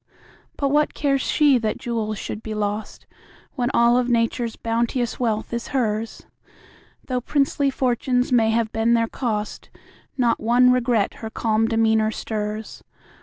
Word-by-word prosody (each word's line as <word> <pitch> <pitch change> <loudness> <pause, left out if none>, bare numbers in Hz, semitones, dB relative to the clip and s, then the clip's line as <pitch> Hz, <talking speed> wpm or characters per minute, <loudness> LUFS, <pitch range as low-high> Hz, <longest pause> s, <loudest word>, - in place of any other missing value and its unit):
But 280 - 0
what 295 +2 +1
cares 275 -2 +1
she 290 -5 +3
that 220 -2 -2
jewels 225 -3 -3
should 215 - -6
be 220 -1 -5
lost, 210 0 -4 0.5
When 245 -1 -1
all 235 +1 +4
of 250 0 -1
Nature's 230 0 0
bounteous 235 +1 -1
wealth 225 -2 -1
is 235 0 -3
hers? 220 -2 -2 0.8
Though 250 -1 -2
princely 280 +1 +1
fortunes 250 -1 0
may 230 -3 +4
have 225 -1 0
been 225 +1 +2
their 230 0 +2
cost, 215 -4 -4 0.5
Not 240 -3 +2
one 245 +3 +4
regret 240 -4 +1
her 220 - -5
calm 220 0 0
demeanor 220 -1 +2
stirs. 215 0 -5
230 Hz, 145 wpm, -22 LUFS, 220-250 Hz, 0.8 s, all